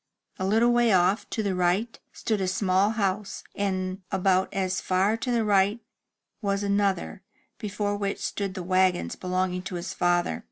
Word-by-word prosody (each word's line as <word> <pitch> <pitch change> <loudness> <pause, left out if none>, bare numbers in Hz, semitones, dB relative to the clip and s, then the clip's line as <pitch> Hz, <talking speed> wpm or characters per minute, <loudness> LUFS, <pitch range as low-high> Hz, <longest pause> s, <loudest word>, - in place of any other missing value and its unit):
A 190 - -1
little 225 +4 +4
way 240 0 +3
oif, 190 0 +2
to 220 - -2
the 200 -2 0
right, 180 +6 0
stood 215 -3 -2
a 190 - 0
small 190 +1 +2
house, 200 -2 -2
and 185 -1 -2
about 190 0 +2
as 190 -1 -1
far 190 +4 +2
to 250 - -4
the 230 -2 +1
right 200 +2 +3 0.6
was 200 -1 -1
another, 200 - 0 0.4
before 205 0 -2
which 200 -1 -2
stood 200 -2 -3
the 185 - -4
wagons 185 0 +1
belonging 185 0 -1
to 185 0 -6
his 175 +1 -4
father. 175 - +1
195 Hz, 165 wpm, -26 LUFS, 185-205 Hz, 0.6 s, little